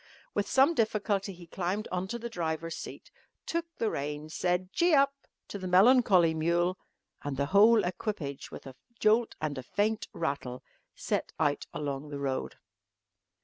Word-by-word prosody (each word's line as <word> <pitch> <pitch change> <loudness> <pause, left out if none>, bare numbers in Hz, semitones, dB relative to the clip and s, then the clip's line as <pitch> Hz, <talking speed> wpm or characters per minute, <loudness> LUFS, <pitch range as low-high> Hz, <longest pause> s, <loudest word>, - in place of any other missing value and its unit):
With 205 -1 -1
some 275 +5 +5
difficulty 210 -5 0
he 175 -2 -12
climbed 185 +5 -3
on 185 +1 -2
to 235 - -3
the 235 0 -5
driver's 165 -5 -3
seat, - - -9 0.3
took 335 0 -2
the 225 - 0
reins, 150 +2 -4
said 180 +2 0
"Gee 345 -2 +4
up" 275 0 +4 0.4
to 200 - -5
the 185 - -4
melancholy 190 -3 +5
mule, 170 +3 +1 0.4
and 145 -2 -4
the 140 - +1
whole 215 +2 +7
equipage 180 -6 -4
with - - -10
a 135 -1 -9 0.2
jolt 220 +2 +3
and 145 -4 -3
faint 210 - 0
rattle 140 -6 -3 0.3
set - - -2
out 145 -2 +1
along 145 0 -4
the 145 - -5
road. 135 -2 -2
180 Hz, 155 wpm, -30 LUFS, 150-215 Hz, 0.4 s, whole